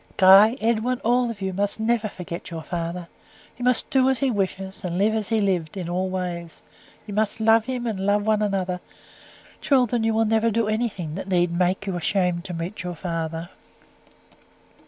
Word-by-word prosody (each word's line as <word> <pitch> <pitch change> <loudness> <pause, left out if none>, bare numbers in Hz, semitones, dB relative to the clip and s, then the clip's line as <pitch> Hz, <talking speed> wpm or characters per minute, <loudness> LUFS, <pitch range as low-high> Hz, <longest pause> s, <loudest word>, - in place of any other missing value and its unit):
"Guy, 195 +6 +7
Edwin, 235 +2 0
all 245 +1 +2
of 220 -3 -7
you, 190 -1 -2
must 200 +3 -1
never 220 0 +1
forget 175 -3 -7
your 165 -2 -6
father. 170 +1 -4 0.5
You - - -5
must 250 -1 +1
do 265 -1 +4
as 265 - +1
he 265 +1 +1
wishes, 195 -1 -3
and 175 -1 -3
live 210 +3 +2
as 215 -3 -2
he 225 -1 +2
lived 185 -4 -1
in 180 -3 -4
all 185 +2 -1
ways. 175 -3 -5 0.4
You 210 - -7
must 215 +1 +1
love 225 0 +4
him, 250 -1 -3
and 220 -4 -2
love 205 +1 +1
one 215 -1 +2
another. 190 -3 -1 0.8
Children, 245 -4 +2
you 225 0 +1
will 225 0 +3
never 225 +1 +2
do 225 0 0
anything 215 -8 -2
that 185 +3 -6
need 175 -2 +2
make 180 +3 0
you 190 -2 -3
ashamed 180 -1 0
to 185 - -6
meet 170 +5 -5
your 180 -1 -5
father." 165 0 -4
200 Hz, 190 wpm, -24 LUFS, 180-225 Hz, 0.8 s, Guy